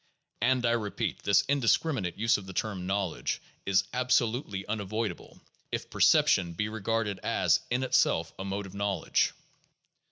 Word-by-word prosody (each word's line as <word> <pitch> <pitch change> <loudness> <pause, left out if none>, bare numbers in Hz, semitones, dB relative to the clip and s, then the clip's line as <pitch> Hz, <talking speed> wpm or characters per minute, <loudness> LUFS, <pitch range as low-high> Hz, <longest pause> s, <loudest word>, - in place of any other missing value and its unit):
And, 125 +1 +2
I 115 - +3
repeat, 110 -4 -2
this 100 0 +4
indiscriminate 135 - +1
use 115 +2 +3
of 100 -2 -10
the 95 - -7
term 95 -5 -2
"knowledge" 95 -10 -1 0.3
is 100 -1 +3
absolutely 125 -5 0
unavoidable 110 +1 -4 0.3
if - - -4
perception 85 -3 +4
be 105 +6 -2
regarded 110 -2 -2
as, - - +2
in 125 +2 0
itself, 80 -9 +2
a - - -3
mode 100 +1 -3
of 95 - -11
knowledge. 100 -3 0
105 Hz, 140 wpm, -29 LUFS, 95-115 Hz, 0.3 s, this